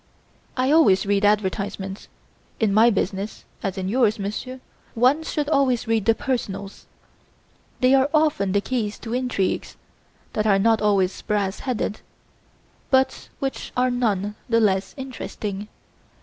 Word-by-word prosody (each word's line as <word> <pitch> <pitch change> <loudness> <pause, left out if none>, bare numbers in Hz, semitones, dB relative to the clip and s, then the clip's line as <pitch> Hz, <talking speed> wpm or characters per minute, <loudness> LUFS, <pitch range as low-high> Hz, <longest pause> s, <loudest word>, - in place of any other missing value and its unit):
I 260 +2 +2
always 255 -12 +5
read 200 0 +1
advertisements. 200 -1 -1 0.5
In 215 -3 +2
my 225 +3 +6
business, 200 -1 -2 0.2
as 195 -2 -3
in 185 -1 -2
yours, 225 0 +2
Monsieur, 215 +6 -5 0.4
one 255 +7 +4
should 300 -2 -2
always 260 -5 +2
read 225 -3 +1
the 225 0 +4
personals.' 200 -7 -4 0.9
They 255 +1 +5
are 270 +1 +4
often 300 -11 +2
the 200 - +2
keys 215 -3 -2
to 225 - -6
intrigues, 250 -7 -1 0.6
that 215 0 0
are 200 -2 +5
not 225 +2 +3
always 200 -3 +1
brass 200 -2 -1
headed, 240 -5 -2 0.9
but 265 0 +1
which 270 -1 -4
are 250 0 +3
none 210 -5 0 0.2
the 230 0 +4
less 195 -3 +1
interesting. 210 -6 -5
215 Hz, 135 wpm, -23 LUFS, 200-255 Hz, 0.9 s, my